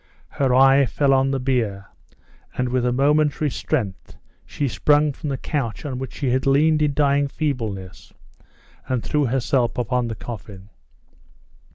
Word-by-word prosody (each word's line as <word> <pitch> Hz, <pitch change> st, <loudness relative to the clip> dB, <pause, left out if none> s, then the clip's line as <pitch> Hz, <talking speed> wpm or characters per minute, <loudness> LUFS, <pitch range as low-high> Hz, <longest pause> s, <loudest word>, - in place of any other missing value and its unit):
Her 135 Hz, -2 st, 0 dB
eye 135 Hz, +1 st, +5 dB
fell 140 Hz, +1 st, +2 dB
on 135 Hz, 0 st, +3 dB
the 135 Hz, 0 st, -1 dB
bier, 115 Hz, -7 st, -1 dB, 0.7 s
and, 125 Hz, 0 st, 0 dB
with 125 Hz, 0 st, 0 dB
a -, -, +1 dB
momentary 145 Hz, +2 st, +2 dB
strength, 100 Hz, -6 st, -3 dB, 0.3 s
she 145 Hz, -, -2 dB
sprung 145 Hz, +3 st, +2 dB
from 150 Hz, -, -6 dB
the 135 Hz, -, -2 dB
couch 130 Hz, -4 st, -4 dB
on 130 Hz, -3 st, -4 dB
which 130 Hz, -, -7 dB
she 135 Hz, -4 st, -1 dB
had 130 Hz, +2 st, 0 dB
leaned 150 Hz, +3 st, +3 dB
in 145 Hz, -2 st, +1 dB
dying 140 Hz, -1 st, +2 dB
feebleness, 110 Hz, -11 st, -4 dB, 0.8 s
and 130 Hz, -3 st, -1 dB
threw 150 Hz, -1 st, 0 dB
herself 125 Hz, -1 st, 0 dB
upon 125 Hz, 0 st, 0 dB
the 110 Hz, -, -4 dB
coffin. 105 Hz, -4 st, -9 dB
135 Hz, 155 wpm, -22 LUFS, 120-145 Hz, 0.8 s, eye